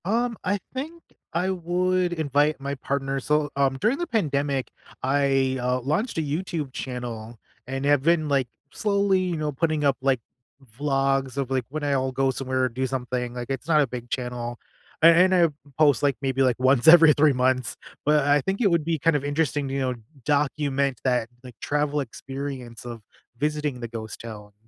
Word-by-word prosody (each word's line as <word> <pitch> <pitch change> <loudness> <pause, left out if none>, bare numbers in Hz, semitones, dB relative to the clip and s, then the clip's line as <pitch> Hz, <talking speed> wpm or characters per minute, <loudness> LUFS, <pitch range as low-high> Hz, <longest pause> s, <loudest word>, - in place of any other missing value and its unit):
Um, 230 +3 0
I 205 +2 +1 0.2
think 315 +6 -6 0.3
I 180 +3 0
would 180 0 0
invite 150 -2 +1
my 140 +1 -4
partner. 135 0 -2
So, 150 +2 +1
um, 135 -1 +1
during 230 - +2
the 345 - -2
pandemic, 140 - -1 0.3
I, 135 -1 +2
uh, 125 +1 0
launched 155 - -1
a - - +2
YouTube 155 -2 -3
channel 120 -3 -6 0.3
and 135 +1 -3
have 145 -1 +4
been, 160 +1 +2
like, 135 -3 +1 0.3
slowly, 200 -2 +2
you 180 -2 -1
know, 150 -1 -2
putting 155 +1 0
up, 140 -2 +2
like, 135 -2 +2 0.6
vlogs 135 -1 0
of, 135 -2 -2
like, 130 -3 0
when 155 +2 -5
I'll 135 -2 0
go 135 +1 +1
somewhere 130 0 -2
or 130 - +2
do 130 +3 -2
something, 125 -1 -3
like, 120 0 -6
it's 135 +1 -4
not 155 -2 +4
a 140 - +1
big 120 0 -7
channel, 120 -1 -4 0.4
and 175 +3 +7
and - - +5
I 170 -2 +5 0.3
post, 145 -3 +4
like, 140 -2 +2
maybe 135 -1 0
like 125 -2 +1
once 130 0 +3
every 165 -2 +9
3 145 0 +4
months, 130 -1 +1 0.3
but 150 0 +4
I 145 0 +4
think 190 - -2
it 205 - +4
would 170 -3 +1
be 165 -2 0
kind 165 +2 +2
of 145 - 0
interesting, 145 -1 -1
you 135 +1 -2
know, 130 -1 -1 0.3
document 140 -2 0
that, 125 -3 +1
like, 125 -2 -11
travel 150 0 0
experience 135 -2 -7
of 120 -2 -7 0.4
visiting 150 -2 -1
the 120 - -5
ghost 110 -2 -7
towns. 105 -3 -9
140 Hz, 185 wpm, -25 LUFS, 130-155 Hz, 0.6 s, every